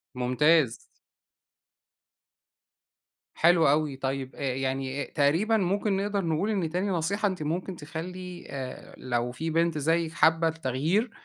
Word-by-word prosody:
ممتاز. 125 Hz, +1 st, +3 dB, 2.6 s
حلو 170 Hz, -2 st, +5 dB
أوي، 150 Hz, -1 st, +1 dB
طيب 135 Hz, 0 st, -3 dB
آآ -, -, -10 dB
يعني 135 Hz, +1 st, -2 dB
تقريبًا 165 Hz, +11 st, +2 dB
ممكن 200 Hz, +1 st, 0 dB
نقدر 200 Hz, -1 st, -1 dB
نقول 165 Hz, +6 st, 0 dB
إن 190 Hz, -7 st, 0 dB
تاني 180 Hz, +5 st, -1 dB
نصيحة 195 Hz, +4 st, 0 dB
أنتِ 185 Hz, -5 st, -3 dB
مُمكن 180 Hz, +4 st, -3 dB
تخلّي 175 Hz, +3 st, -7 dB
آآ 130 Hz, -2 st, -7 dB
لو 120 Hz, -1 st, -2 dB
في 160 Hz, +6 st, -4 dB
بنت 165 Hz, 0 st, +1 dB
زيِك 165 Hz, +2 st, +1 dB
حابة 165 Hz, 0 st, +4 dB
التغيير، 160 Hz, -, 0 dB
160 Hz, 125 wpm, -27 LUFS, 140-180 Hz, 2.6 s, حلو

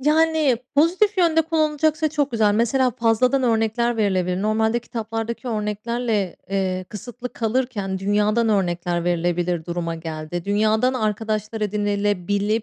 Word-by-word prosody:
Yani, 305 Hz, -2 st, +3 dB, 0.2 s
pozitif 370 Hz, +7 st, +3 dB
yönde 325 Hz, -2 st, +4 dB
kullanılacaksa 310 Hz, -1 st, +1 dB
çok 290 Hz, -2 st, -1 dB
güzel. 215 Hz, -3 st, +2 dB
Mesela 250 Hz, +3 st, +2 dB
fazladan 245 Hz, +4 st, +2 dB
örnekler 230 Hz, 0 st, +1 dB
verilebilir. 185 Hz, -3 st, 0 dB
Normalde 220 Hz, +2 st, +1 dB
kitaplardaki 230 Hz, +1 st, -5 dB
örneklerle, 210 Hz, -2 st, -2 dB
eee, 185 Hz, -1 st, -1 dB
kısıtlı 245 Hz, +4 st, -8 dB
kalırken, 225 Hz, -5 st, -1 dB
dünyadan 210 Hz, +3 st, +1 dB
örnekler 175 Hz, -3 st, 0 dB
verilebilir 175 Hz, -1 st, 0 dB
duruma 170 Hz, -1 st, -3 dB
geldi. 160 Hz, +1 st, -5 dB
Dünyadan 215 Hz, +5 st, +2 dB
arkadaşlar 215 Hz, -1 st, -2 dB
edinebilir 205 Hz, 0 st, 0 dB
de -, -, -23 dB
220 Hz, 120 wpm, -22 LUFS, 195-250 Hz, 0.2 s, yönde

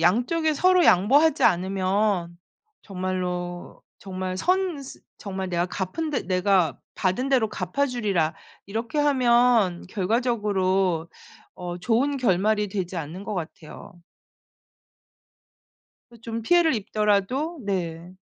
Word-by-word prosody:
양쪽이 250 Hz, -, +2 dB
서로 365 Hz, +3 st, +4 dB
양보하지 280 Hz, -, +4 dB
않으면 185 Hz, -1 st, +1 dB, 0.4 s
정말로 180 Hz, -2 st, -4 dB, 0.2 s
정말 185 Hz, -1 st, -5 dB
선 360 Hz, -, 0 dB
스 270 Hz, -, -11 dB, 0.2 s
정말 190 Hz, -2 st, -5 dB
내가 175 Hz, 0 st, 0 dB
갚은 190 Hz, -, -4 dB
대 285 Hz, -, -1 dB
'내가 185 Hz, -2 st, +1 dB, 0.2 s
받은 190 Hz, +8 st, -1 dB
대로 255 Hz, -5 st, +2 dB
갚아 185 Hz, +9 st, -1 dB
주리라.' 200 Hz, -, 0 dB, 0.3 s
이렇게 225 Hz, +8 st, -3 dB
하면 245 Hz, -9 st, +3 dB
결과적으로 195 Hz, -5 st, 0 dB, 0.5 s
어 175 Hz, -1 st, -6 dB
좋은 245 Hz, +9 st, +1 dB
결말이 210 Hz, -2 st, +1 dB
되지 190 Hz, -2 st, -4 dB
않는 165 Hz, +4 st, -6 dB
것 210 Hz, -, -4 dB
같아요. 160 Hz, -3 st, -8 dB, 2.2 s
그게 235 Hz, -2 st, -17 dB
좀 230 Hz, 0 st, -5 dB
피해를 340 Hz, +4 st, +4 dB
입더라도 215 Hz, -, 0 dB
네. 175 Hz, -2 st, -4 dB
200 Hz, 235 characters per minute, -24 LUFS, 185-250 Hz, 2.2 s, 서로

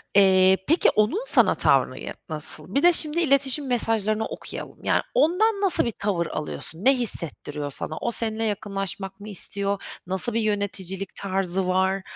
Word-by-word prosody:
eee, 190 Hz, -1 st, +5 dB
peki 325 Hz, +4 st, +3 dB
onun 215 Hz, -, 0 dB
sana -, -, +5 dB
tavrı -, -, +1 dB
ya -, -, -7 dB, 0.2 s
nasıl? 155 Hz, -, +2 dB
Bir 280 Hz, -, +2 dB
de 350 Hz, 0 st, +6 dB
şimdi 320 Hz, +1 st, +3 dB
iletişim 275 Hz, -1 st, +2 dB
mesajlarını 220 Hz, -3 st, +1 dB
okuyalım, -, -, -9 dB
yani, -, -, +1 dB
ondan 400 Hz, +6 st, +1 dB
nasıl 385 Hz, -10 st, +3 dB
bir 235 Hz, -, -2 dB
tavır 185 Hz, -5 st, -1 dB
alıyorsun? 160 Hz, +5 st, -7 dB
Ne 270 Hz, 0 st, +6 dB
hissettiriyor 150 Hz, -, 0 dB
sana? 155 Hz, +3 st, -6 dB
O, 235 Hz, -, -3 dB
seninle 225 Hz, -1 st, -2 dB
yakınlaşmak 195 Hz, -2 st, -4 dB
mı 210 Hz, +1 st, -10 dB
istiyor? 200 Hz, +1 st, 0 dB, 0.3 s
Nasıl 190 Hz, +5 st, +1 dB
bir 230 Hz, -, 0 dB
yöneticilik 195 Hz, -2 st, -3 dB
tarzı 190 Hz, -1 st, -2 dB
var? 190 Hz, +1 st, 0 dB
200 Hz, 160 wpm, -23 LUFS, 190-240 Hz, 0.3 s, de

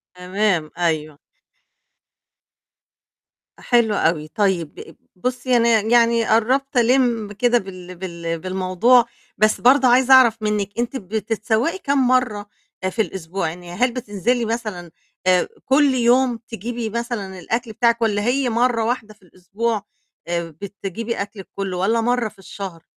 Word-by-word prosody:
تمام، 180 Hz, -3 st, -1 dB
أيوه. 155 Hz, -4 st, -1 dB, 2.4 s
حلو 235 Hz, -3 st, +2 dB
أوي، 155 Hz, -3 st, 0 dB
طيب 180 Hz, -4 st, -2 dB, 0.2 s
بُصّي، 250 Hz, +4 st, 0 dB
أنا 235 Hz, 0 st, +3 dB
ي 220 Hz, +3 st, -3 dB
يعني 235 Hz, -1 st, +4 dB
قربت 255 Hz, +5 st, +1 dB
ألِمّ 235 Hz, -3 st, +2 dB
كده 240 Hz, +3 st, +2 dB
بال 185 Hz, -3 st, -8 dB
بال 170 Hz, -2 st, -5 dB
بالموضوع، 185 Hz, +7 st, +3 dB, 0.3 s
بس 215 Hz, 0 st, +2 dB
برضو 255 Hz, +1 st, +5 dB
عايزة 255 Hz, +2 st, +5 dB
أعرف 235 Hz, -4 st, +6 dB
منِك 210 Hz, -2 st, -1 dB
أنتِ 240 Hz, +3 st, -2 dB
بتتسوّقي 220 Hz, -, -1 dB
كام 280 Hz, -6 st, +1 dB
مرّة 230 Hz, -5 st, +1 dB, 0.3 s
آآ 185 Hz, -, +1 dB
في 220 Hz, +4 st, -1 dB
الأسبوع؟ 185 Hz, -3 st, -3 dB
يعني 175 Hz, +1 st, -10 dB
هل 245 Hz, +7 st, +1 dB
بتنزلي 240 Hz, 0 st, -1 dB
مثلًا، 215 Hz, -7 st, -4 dB, 0.4 s
آآ 180 Hz, -1 st, +4 dB, 0.2 s
كل 275 Hz, 0 st, +4 dB
يوم 245 Hz, 0 st, +3 dB
تجيبي 230 Hz, +1 st, -5 dB
مثلًا 220 Hz, -5 st, -4 dB
الأكل 230 Hz, +5 st, -3 dB
بتاعِك، 235 Hz, +1 st, +2 dB
والّا 205 Hz, -2 st, +1 dB
هي 250 Hz, +2 st, +1 dB
مرّة 235 Hz, 0 st, +1 dB
واحدة 225 Hz, -2 st, -2 dB
في 210 Hz, -, -32 dB
الأسبوع، 200 Hz, +5 st, -3 dB, 0.5 s
آآ، 170 Hz, -1 st, -2 dB
بتجيبي 205 Hz, +3 st, -5 dB
أكلِك 200 Hz, -1 st, -7 dB
كُلّه، 195 Hz, -2 st, -3 dB
والّا 225 Hz, +5 st, +1 dB
مرّة 240 Hz, -1 st, 0 dB
في -, -, -24 dB
الشهر؟ 190 Hz, -3 st, -8 dB
220 Hz, 135 wpm, -21 LUFS, 185-240 Hz, 2.4 s, أعرف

